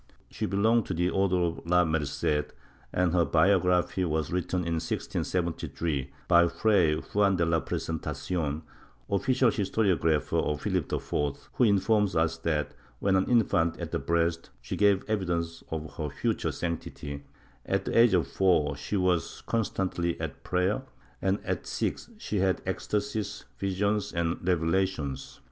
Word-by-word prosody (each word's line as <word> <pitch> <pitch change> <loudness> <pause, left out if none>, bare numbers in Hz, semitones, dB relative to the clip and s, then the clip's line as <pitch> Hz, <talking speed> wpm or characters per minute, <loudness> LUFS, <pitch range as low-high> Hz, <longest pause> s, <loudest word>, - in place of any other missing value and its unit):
She - - -2
belonged 110 +4 +2
to 90 - -2
the 90 +2 +1
Order 95 -1 +2
of 85 -1 -2
La 90 +1 +4
Merced, 75 -1 -1 0.4
and 90 -2 +1
her 90 -1 +4
biography 90 +1 +3
was 80 -3 -1
written 90 +1 -1
in 85 -2 -1
1673, 80 -5 -2 0.2
by 85 0 +6
Fray 85 -2 +3
Juan 100 +4 +1
de 85 -2 +2
la 80 0 +2
Presentacion, 80 -1 -3 0.5
official 130 +3 +3
historiographer 95 -7 +1
of 75 -1 -1
Philip - - -1
IV, 70 -1 -2
who 125 - +3
informs 105 0 +3
us 80 0 +2
that, 80 -2 -1 0.2
when 95 +8 +1
an 95 - +2
infant 85 -9 +2
at - - -5
the - - 0
breast, 85 +3 0
she - - -5
gave 100 -2 +3
evidence 85 -6 -2
of 80 -2 -5
her 75 -2 -2
future - - -1
sanctity; 75 -4 -5 0.4
at - - -1
the - - -2
age 115 -3 +6
of 85 -5 +2
four 75 -2 +2
she 100 +8 -3
was 90 -3 0
constantly 95 -6 -1
at - - -5
prayer, 90 +7 +1 0.4
and 95 +1 +2
at - - -3
six - - -2
she 105 - -2
had 95 0 +2
ecstasies, 105 +4 -2
visions 100 +1 0
and 85 +1 -2
revelations. 85 -5 0
90 Hz, 145 wpm, -28 LUFS, 80-100 Hz, 0.5 s, by